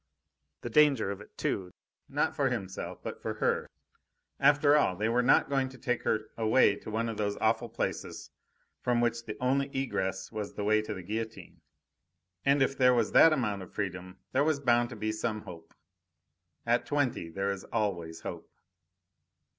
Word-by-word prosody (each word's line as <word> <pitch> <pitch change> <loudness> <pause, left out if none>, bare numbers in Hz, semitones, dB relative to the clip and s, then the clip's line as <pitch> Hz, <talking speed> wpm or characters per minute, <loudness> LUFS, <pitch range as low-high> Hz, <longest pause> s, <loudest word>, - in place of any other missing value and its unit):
The 120 - -6
danger 135 -7 +4
of 100 0 -6
it, - - -16
too 95 -2 -2 0.4
not - - 0
for 135 -2 +2
himself, 95 -6 -5
but - - -6
for - - -3
her. - - 0 0.7
After 145 +1 +5
all, 120 -11 +3
they 105 +4 -1
were 120 +2 +3
not 125 - +4
going 135 -2 0
to 130 - -13
take 125 -2 -1
her 110 0 -1
away 115 +3 +4
to - - -9
one 115 +2 -1
of 115 -2 -4
those 100 -1 -1
awful 110 +2 +1
places 115 - -4 0.5
from 125 -1 +1
which 120 0 0
the - - -5
only 135 +2 +1
egress 95 -8 -2
was 105 -2 -5
the 105 - -3
way 110 +1 +3
to 110 -1 -5
the 95 - -7
guillotine; 110 +4 -6 0.8
and 140 0 +4
if 135 - 0
there 125 -2 +5
was 115 -3 +1
that 165 - +7
amount 105 -9 0
of 90 - -12
freedom 95 -2 -4
there 135 - +3
was 155 -1 +1
bound 120 -3 +2
to 125 - -8
be 110 0 -2
some 110 0 -2
hope. 85 -4 -11 0.9
At 120 +1 +1
twenty 140 - 0
there 95 +4 -1
is 100 -1 -5
always 90 -7 -2
hope! - - -7
115 Hz, 180 wpm, -30 LUFS, 100-130 Hz, 0.9 s, that